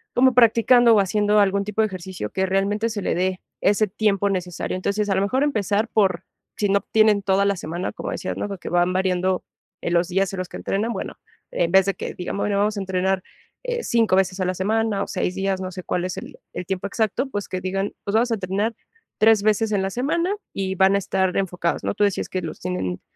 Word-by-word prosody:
como 260 +1 +5
practicando, 235 0 +6
o 210 - +5
haciendo 210 +2 +2
algún 200 0 +3
tipo 210 +1 0
de 215 - +3
ejercicio, 185 - -6
que 190 - 0
realmente 200 +4 0
se 210 -2 -4
le - - 0
dé 185 +1 -1 0.2
ese 210 +1 +3
tiempo 200 0 +1
necesario. 180 -3 -3
Entonces, 200 +3 -1
a 195 - +2
lo 190 - +2
mejor 255 +8 +1
empezar 215 -5 0
por, 190 -6 +1 0.3
si 205 - +1
no 200 0 +3
tienen 215 -2 +4
toda 195 0 +2
la 200 0 +2
semana, 175 +2 -4
como - - -5
decías, - - -4
¿no?, - - -2
porque, 195 -3 -6
van 175 +1 +2
variando, 185 0 0 0.4
eh, - - -2
los 175 0 +2
días 195 +1 0
en 190 - -4
los 185 -1 -4
que - - -7
entrenan, 220 +4 -1
bueno, - - -6 0.3
en 170 - 0
vez 190 0 +6
de 195 - +1
que, - - -6
digamos, 180 +2 -3
bueno, 205 -1 0
vamos 210 +1 +1
a - - -1
entrenar, 190 0 0 0.4
eh, 485 -1 -2
5 225 -5 +2
veces 190 0 +1
a 185 - 0
la 185 - 0
semana, 210 +1 0
o - - -6
6 185 -1 -2
días, 195 -1 -1
no 185 0 -4
sé 185 0 -7
cuál 180 +1 -1
es 185 - -3
el - - -9
el 180 - -5
tiempo 190 +1 -3
exacto, 220 +5 -1
pues, 205 -5 -4
que 185 - -3
digan: 195 +2 -2
"Pues 200 - -2
vamos 235 +2 +2
a - - +3
entrenar, 200 +3 -1 0.5
3 215 -1 +5
veces 215 +1 +2
en 195 - +2
la 195 - -1
semana 330 - 0 0.2
y 190 -1 -2
van 190 +1 +4
a - - +4
estar 190 -1 0
enfocados", 180 -3 -1
¿no?, - - -1
tú 205 - 0
decías, 200 - -1
que 185 - -2
los - - -6
tienen 95 - -3
195 Hz, 235 wpm, -23 LUFS, 185-215 Hz, 0.5 s, practicando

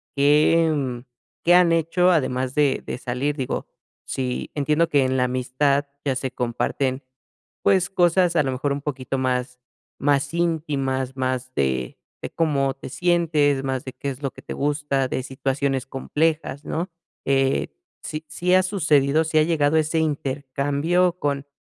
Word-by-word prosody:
¿qué, 150 +3 +4
mm, 125 -3 -3 0.4
qué 175 - +5
han 175 -2 +5
hecho 165 +2 +3
además 130 -4 0
de 145 -3 +2
de - - -4
salir?, 130 +4 -2
digo, 130 - -3 0.4
si 125 -2 -3
entiendo 150 +3 +1
que 140 -4 +3
en 130 - 0
la 125 - +3
amistad 130 +3 +1 0.2
ya 135 - +1
se 130 0 -3
comparten, 130 +2 -2 0.6
pues, 185 -3 +3
cosas 175 -1 +3
a 155 - +5
lo 135 - -1
mejor 140 +2 -1
un 140 - -4
poquito 135 -2 -3
más 125 0 -1 0.4
más 140 +1 +1
íntimas, 140 -6 -1
más 130 0 -2
de 65 -2 -1 0.2
de - - -5
cómo 140 -5 +1
te 135 - -9
sientes, 155 -4 +2
más 130 -1 -2
de 130 - -6
qué 140 - -4
es 135 +2 -10
lo 135 - 0
que - - -13
te - - -6
gusta, 145 -2 0
de 130 - -2
situaciones 135 0 -1
complejas, 150 +1 -1
¿no?, 170 +3 -3 0.4
eh, 135 0 +1 0.3
¿sí 155 0 -5
sí 180 +1 0
ha 185 - +6
sucedido, 160 -6 +2
sí 155 0 0
ha 155 - +5
llegado 155 -2 +2
ese 155 +1 +1
intercambio 145 +4 0
con 140 -1 -2
140 Hz, 160 wpm, -23 LUFS, 130-160 Hz, 0.6 s, ha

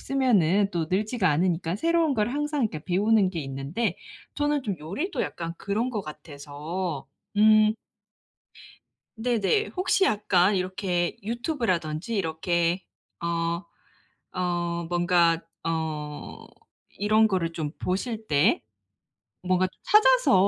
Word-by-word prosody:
쓰면은 205 -8 +2
또 170 -3 -1
늘지가 205 0 +1
않으니까 170 +2 +1
새로운 330 +3 +2
걸 215 -1 +1
항상 295 0 -1
이렇게 160 -9 -2
배우는 200 +2 +3
게 170 -4 -4
있는데 135 - -3 0.4
저는 290 -1 0
좀 200 -5 -2
요리도 235 - -3
약간 165 -1 -4
그런 220 +5 -1
것 215 - -2
같아서. 150 +1 -6 0.3
음. 215 0 +6 1.4
네네. 240 - +1
혹시 370 +1 +2
약간 200 - +3
이렇게 185 -1 -1
유튜브라든지 225 - -2
이렇게 170 0 0 0.4
어, 170 +1 -1 0.7
어 175 -1 -1
뭔가 175 -1 +3 0.2
어 155 -2 -4 0.4
이런 215 +2 +3
거를 180 -5 -1
좀 155 -3 -3
보실 220 +4 -3
때 145 -3 +3 0.8
뭔가 185 0 +2 0.2
찾아서 - - +5
185 Hz, 230 characters per minute, -26 LUFS, 165-225 Hz, 1.4 s, 음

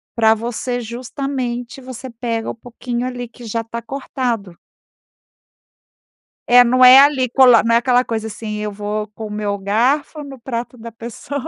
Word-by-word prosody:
Pra 220 -1 +4
você 240 +2 -3
justamente 245 +1 -5
você 255 0 -9
pega 230 -1 -4
o - - -5
pouquinho 245 +1 -5
ali 245 -1 -5
que 240 +1 -14
já 230 +1 -2
está 230 +1 -7
cortado. 235 -8 -4 1.9
É, 245 +1 +8
não 255 +1 +4
é 255 +2 +10
ali 275 -2 +4
cola 250 -2 +6
não 230 - +2
é - - +6
aquela 250 0 +2
coisa, 220 -1 -3
assim, 215 0 -6
eu 210 0 -3
vou 210 +1 -4
com 220 - -7
o 210 - -7
meu 210 -1 -2
garfo 250 +10 0
no 270 -2 -10
prato 240 +1 -5
da 230 0 -9
pessoa. 235 +5 -7
240 Hz, 165 wpm, -19 LUFS, 225-255 Hz, 1.9 s, é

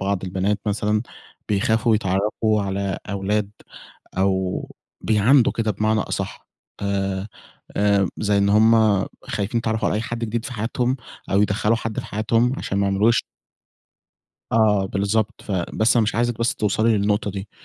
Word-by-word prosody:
بعض 95 -1 -1
البنات 95 +2 -1
مثلًا 105 +1 0 0.5
بيخافوا 110 +3 +2
يتعرَّفوا 105 +1 0
على 100 -1 -2
أولاد 100 +1 -1 0.7
أو 95 -1 0 0.3
بيعاندوا 115 +4 +4
كده 110 -2 -1
بمعنى 110 +2 +1
أصح، - - -5 0.3
آآ 100 0 -1 0.5
آآ 100 -2 +3
زي 105 -1 +1
إن 100 0 +3
هُم 110 +2 +5 0.5
خايفين 105 +3 -2
يتعرَّفوا 110 -2 0
على - - 0
أي 110 - -1
حد 115 0 -4
جديد 115 0 -3
في 130 - -5
حياتهم، 120 +3 -1 0.3
أو 100 +1 +4
يدخَّلوا 105 +2 +1
حد 115 -1 -3
في - - -10
حياتهم 115 +3 +1
عشان 100 - -2
ما 100 - +2
عمروش 105 +4 +3 1.3
آه 105 -3 +3
بالضبط، 100 +2 -1
ف - - -7
بس 95 +5 +1
أنا 115 - +4
مش 110 - -1
عايزِك 120 0 0
بس 115 +1 +1
توصَلي 110 +1 +2
للنقطة 105 +1 0
دي، 100 +1 -6
105 Hz, 150 wpm, -22 LUFS, 100-110 Hz, 1.3 s, هُم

